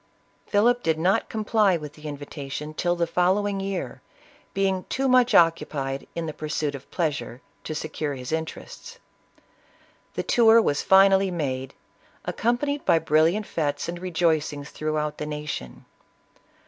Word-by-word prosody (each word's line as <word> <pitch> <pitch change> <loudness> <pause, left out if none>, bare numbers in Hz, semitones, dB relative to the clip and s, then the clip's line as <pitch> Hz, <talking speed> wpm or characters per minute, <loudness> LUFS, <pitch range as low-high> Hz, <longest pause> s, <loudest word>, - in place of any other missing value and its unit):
Philip 240 +4 +3
did 160 -5 +1
not 185 +7 +1
comply 215 -3 +2
with 150 -2 -8
the 155 0 -10
invitation 145 +1 -6
till 175 +2 0
the 170 -1 +1
following 190 +4 +1
year, 195 -1 -4 0.5
being 190 -1 0
too 270 +1 -1
much 250 -1 +4
occu 165 -1 +4
pied 135 -2 -4
in 170 -1 -2
the 155 - -4
pursuit 150 -1 -2
of 140 -1 -10
pleasure, 140 -7 -2 0.3
to 155 - -4
secure 150 -1 -3
his 125 +1 -7
interests. 160 - -5 1.2
The - - -1
tour 230 -1 +6
was 145 -10 +1
finally 195 0 +5
made, 135 -7 -3 0.5
accompanied 280 +6 -1
by - - +4
brilliant 160 +7 +2
fetes 145 -5 -2
and 175 +1 -5
rejoicings 160 -5 -1
throughout 155 -1 -2
the 150 - -3
nation. 150 - -6
165 Hz, 140 wpm, -25 LUFS, 150-195 Hz, 1.2 s, tour